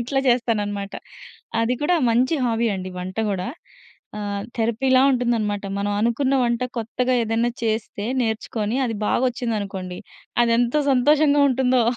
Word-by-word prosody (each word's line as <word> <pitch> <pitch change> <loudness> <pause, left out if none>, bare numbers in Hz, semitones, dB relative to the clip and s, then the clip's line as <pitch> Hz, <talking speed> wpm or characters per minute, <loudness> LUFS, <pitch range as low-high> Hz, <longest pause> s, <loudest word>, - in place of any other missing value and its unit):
ఇట్లా 270 +3 0
చేస్తాననమాట. 210 -5 0 0.7
అది 230 +2 +1
కూడా 295 +5 +2 0.2
మంచి 250 +7 +2
హాబీ 235 -1 +1
అండి 185 -1 -5
వంట 185 +1 -6
కూడా. 190 0 -2 0.7
ఆహ్, 200 -1 -3 0.2
థెరపీ 230 +3 0
లా 255 - +6
ఉంటుందనమాట. 230 -5 0 0.2
మనం 205 +1 -1
అనుకున్న 255 +5 +1
వంట 235 +1 0 0.2
కొత్తగా 250 +3 -1
ఏదైనా 225 +2 0
చేస్తే 220 -1 -2 0.2
నేర్చుకొని 220 0 -2
అది 225 -2 -3
బాగొచ్చిందనుకోండి 210 -7 -2 0.5
అదెంత 240 +5 +2
సంతోషంగా 290 +2 +4
ఉంటుందో. 255 -1 +2
230 Hz, 125 wpm, -22 LUFS, 210-250 Hz, 0.7 s, లా